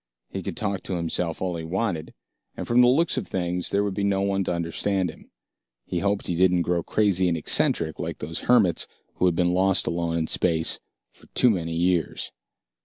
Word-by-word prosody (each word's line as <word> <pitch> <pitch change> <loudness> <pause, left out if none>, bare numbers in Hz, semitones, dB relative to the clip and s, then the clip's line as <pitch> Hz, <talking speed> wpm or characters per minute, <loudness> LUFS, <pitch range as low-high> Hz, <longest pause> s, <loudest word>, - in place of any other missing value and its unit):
He 95 - -4
could - - -6
talk 100 -5 -2
to 95 - -4
himself 85 0 -2
all 90 -2 -2
he 80 - -6
wanted, 85 -1 -3 0.4
and - - -4
from 120 +1 +4
the 125 - +6
looks 150 +7 +2
of - - -3
things, 90 -1 -2
there 100 +1 +1
would 100 -1 -2
be 100 +1 -2
no 100 -1 +1
one 100 0 0
to - - -1
understand 85 +2 -1
him. - - -18 0.6
He 90 - -2
hoped 100 +2 -1
he 85 - -1
didn't 90 0 +3
grow 85 0 0
crazy 95 -1 +2
and 85 -1 +1
eccentric, 80 +1 +3
like - - -4
those 80 +3 -5
hermits 105 -9 +3 0.3
who - - +2
had 90 - +1
been 90 0 +2
lost 95 0 +2
alone 85 0 -1
in 80 - 0
space 80 0 0 0.3
for - - -21
too 125 - +5
many 85 -5 -2
years. 85 -2 0
90 Hz, 205 wpm, -25 LUFS, 85-100 Hz, 0.6 s, the